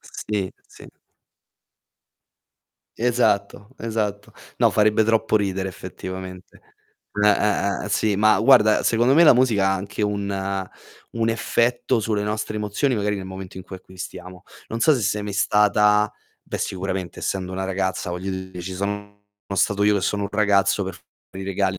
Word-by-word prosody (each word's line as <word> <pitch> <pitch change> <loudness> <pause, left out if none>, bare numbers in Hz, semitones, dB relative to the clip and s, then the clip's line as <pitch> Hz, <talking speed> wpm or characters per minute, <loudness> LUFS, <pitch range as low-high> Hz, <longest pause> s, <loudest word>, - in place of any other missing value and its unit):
Sì, 100 -3 -4 0.2
sì. - - -15 2.1
Esatto, 110 -4 0
esatto. 105 -2 -3 0.3
No - - +4
farebbe 105 +1 +3
troppo 110 0 +2
ridere 95 -2 -1
effettivamente. 95 0 -8 0.6
Eh, 105 - +6
eh, 100 -1 +1
eh, - - -5
sì, 105 0 +1
ma 110 +1 +4
guarda, 110 -6 +5
secondo 120 +3 +3
me, 170 +3 +7
la 150 - +8
musica 115 -6 +3
ha 95 - +2
anche 100 +2 -4
un 100 -2 -2 0.4
un 115 -1 -1
effetto 120 +1 +1
sulle 105 -1 -1
nostre 105 +1 -3
emozioni 105 +6 0
magari 105 -1 -1
nel 95 - -6
momento 95 0 -8
in 95 - -7
cui 95 - -9
acquistiamo. 90 0 -10 0.2
Non 115 - -4
so 155 +5 +5
se 130 - -1
sei 105 0 0
mai 105 0 -5
stata 105 +1 +3 0.3
beh - - -5
sicuramente 95 -2 -4
essendo 95 -1 -3
una 95 +1 -3
ragazza, 95 -1 -2
voglio 90 +2 -4
dire, 95 -1 -6
ci 95 +2 -6
sono 100 +1 -4 0.3
sono 100 - -2
stato 100 0 +2
io 105 0 +4
che 100 - 0
sono 100 +2 0
un - - -3
ragazzo 100 -1 +2
per 95 - -4
fare 95 +3 -13
i - - -7
regali 95 0 0
100 Hz, 165 wpm, -22 LUFS, 95-105 Hz, 2.1 s, la